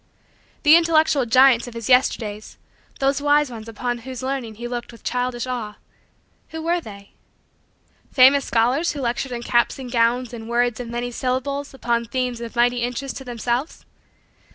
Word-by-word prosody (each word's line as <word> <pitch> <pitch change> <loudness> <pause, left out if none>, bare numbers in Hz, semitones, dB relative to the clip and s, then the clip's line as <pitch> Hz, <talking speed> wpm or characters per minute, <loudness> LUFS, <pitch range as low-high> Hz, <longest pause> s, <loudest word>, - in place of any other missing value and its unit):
The 305 +1 +8
intellectual 315 -5 +3
giants 255 0 +5
of 240 - -10
his 230 -2 -5
Yesterdays 220 -4 +1 0.4
those 275 +1 +1
wise 290 -1 +3
ones 225 -1 -8
upon 240 +2 -3
whose 255 +1 -8
learning 260 -4 -3
he 240 +3 -6
looked 240 0 -5
with 230 - -16
childish 250 -1 -2
awe 235 -5 -4 0.7
who 320 - -7
were 340 +2 0
they? 200 -6 -12 1.0
Famous 270 +2 +6
scholars 250 +9 +1
who 290 - -6
lectured 250 +1 -2
in 240 -1 -5
caps 240 0 +1
and 255 -2 -8
gowns 240 +1 +1
and 225 -1 -8
words 240 -1 +1
of 245 - -5
many 240 +1 -4
syllables 265 +3 -2
upon 235 -2 -1
themes 250 0 -3
of 235 +1 -7
mighty 245 +1 +3
interest 245 +3 -3
to 265 - -8
themselves? 245 +3 -3
245 Hz, 165 wpm, -22 LUFS, 235-270 Hz, 1.0 s, The